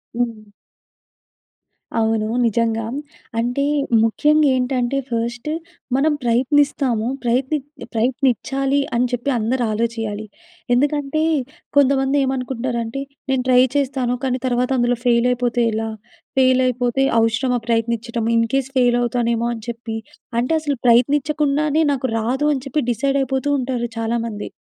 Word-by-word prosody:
హ్మ్. 230 -3 -3 1.5
అవునూ. 220 -1 +1 0.2
నిజంగా. 225 0 0 0.5
అంటే 245 +4 0 0.4
ముఖ్యంగ 300 +7 +3
ఏంటంటే, 250 0 0
ఫస్ట్ 235 +4 -3 0.5
మనం 295 +3 +3
ప్రయత్నిస్తాము. 255 -1 +2 0.2
ప్రయత్నిత్ 265 +4 0 0.3
ప్రయత్నించాలి 270 +3 +1 0.2
అని 245 +1 +3
చెప్పి 245 +3 -2
అందరూ 240 +3 0
ఆలోచించాలి. 225 -2 -2 0.5
ఎందుకంటే 290 +3 +1 0.6
కొంతమంది 270 0 +3
ఏమనుకుంటరంటే, 255 -1 -2 0.3
"నేను 265 -1 +1
ట్రై 250 0 +6
చేస్తాను. 260 -3 0
కానీ 255 -1 0
తర్వాత 245 0 +1
అందులో 240 0 +2
ఫెయిల్ 240 0 +4
అయిపోతే 245 -1 0
ఎలా? 225 +1 -2 0.5
ఫెయిలయిపోతే 255 -1 +3 0.2
అవసరమా 225 +3 +1
ప్రయత్నిచ్చడం? 230 0 -1
ఇన్ 230 0 +3
కేస్ 270 -1 +1
ఫెయిల్ 245 -1 +4
అవుతానేమో" 235 -1 0
అని 225 -2 -8
చెప్పి, 230 -1 -5 0.4
అంటే 250 +6 0
అసలు 290 -4 -2
ప్రయత్నిచ్చకుండానే 290 +4 +3
నాకు 260 -2 -2
రాదు 260 +6 0
అని 265 -2 -3
చెప్పి, 295 +3 0
డిసైడ్ 275 +4 0
అయిపోతూ 265 +2 -1
ఉంటారు 245 -2 -2
చాలామంది. 225 -2 -2
245 Hz, 115 wpm, -20 LUFS, 235-270 Hz, 1.5 s, ట్రై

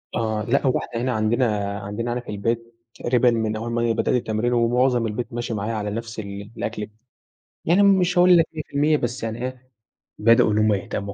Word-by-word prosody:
آه، 110 -2 -1
لأ، 135 +3 +1
هو 130 - +2
إحنا 115 - -5
هنا 130 +1 0
عندنا 110 -3 0
عندنا 105 +4 -4
هنا 125 - -2
في - - -14
البيت 115 +3 -3 0.2
تقريبًا 120 0 +2
من 110 -2 -1
أول 115 +2 -4
ما 120 0 0
أنا 120 - +1
بدأت 120 - 0
التمرين 120 +1 0
ومعظم 120 0 +2
البيت 115 +3 -5
ماشي 120 -1 -3
معايا 105 +2 -3
على 105 -2 -3
نَفْس 115 +1 -5
ال 100 0 -7
الأكل 105 -1 -3
ب - - -21 0.8
يعني 180 +5 +4
مش 185 -2 +3
هاقول 180 0 +7
لك 165 - +4
100% 150 0 0
بس 120 -2 -4
يعني 115 +1 -4
إيه، 130 0 -8 0.5
بدأوا 115 0 +4
إن 105 - +1
هم 110 0 +3
يهتموا 100 0 -4
115 Hz, 205 wpm, -23 LUFS, 110-125 Hz, 0.8 s, هاقول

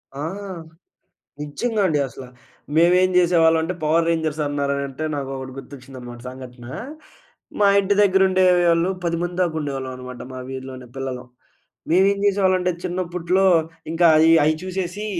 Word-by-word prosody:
ఆ! 140 - -6 1.2
నిజ్జంగా 210 +10 -2
అండి 150 -4 +1
అసల. 130 0 -10 0.5
మేమేం 180 +3 +4
జేసేవాళ్ళం 165 -2 +4
అంటే, 180 +3 -2
పవర్ 165 +2 +2
రేంజర్స్ 160 -2 -1
అన్నారనంటే 140 0 -2
నాకొకటి 135 -2 -5
గుర్తొచ్చిందన్నమాట 130 -3 -10
సంఘటన. 125 -2 -11 0.9
మా 205 - +5
ఇంటి 200 +1 +1
దగ్గరుండేవాళ్ళు 185 -3 +3
10 170 -1 -1
మంది 175 0 -4
దాకా 170 -3 0
ఉండేవాళ్ళం 135 -3 -4
అనమాట. 125 -1 -9
మా 130 - -6
వీధిలోనే 130 -1 -8
పిల్లలం. 130 -2 -5 0.6
మేమేం 195 +3 +3
జేసేవాళ్ళంటే, 185 -2 +2
చిన్నప్పట్లో 180 +1 -1 0.5
ఇంకా 170 +1 +4
అయి, 160 +1 +5
అయి 155 +1 +2
చూసేసి 185 +2 -4
165 Hz, 120 wpm, -22 LUFS, 135-180 Hz, 1.2 s, మా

